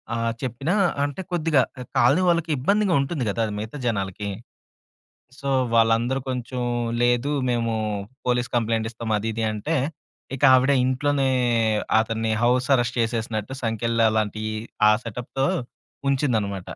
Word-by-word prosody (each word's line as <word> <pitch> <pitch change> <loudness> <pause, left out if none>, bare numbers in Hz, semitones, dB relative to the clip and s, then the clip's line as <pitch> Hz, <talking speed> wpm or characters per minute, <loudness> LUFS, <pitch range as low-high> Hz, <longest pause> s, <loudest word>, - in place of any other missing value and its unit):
ఆహ్, 115 0 0
చెప్పినా 135 - -2 0.3
అంటే 145 +5 -3
కొద్దిగా 160 -5 +2 0.2
ఎ - - -4
కాలనీ 170 +7 +4
వాళ్ళకి 170 -1 +1
ఇబ్బందిగా 200 +8 +2
ఉంటుంది 140 -2 -2
కదా, 110 - -3
అది 105 - -4
మిగతా 110 +7 -6
జనాలకి. 100 -1 -2 1.1
సో, 140 - -5 0.3
వాళ్ళందరూ 115 +3 +3
కొంచుం 125 0 -3 0.4
లేదు 120 +3 +2 0.2
మేము 115 -1 0 0.5
పోలీస్ 125 0 0
కంప్లెయింట్ 115 -1 0
ఇస్తాం. 115 -1 -4
అది 110 +2 -3
ఇది 115 - -1
అంటే, 150 +10 -2 0.6
ఇక 135 - -13
ఆవిడ 130 +2 +4
ఇంట్లోనే 135 +1 +1 0.7
అతన్ని 115 0 -1
హౌస్ 125 +1 +2
అరెస్ట్ 120 0 -1
చేసేసినట్టు 115 0 -2
సంకెళ్ళలాంటియి, 110 -1 0 0.4
ఆ - - +6
సెటప్‌తో 125 +4 -3 0.6
ఉంచిందనమాట. 110 -9 0
120 Hz, 125 wpm, -24 LUFS, 110-135 Hz, 1.1 s, ఆ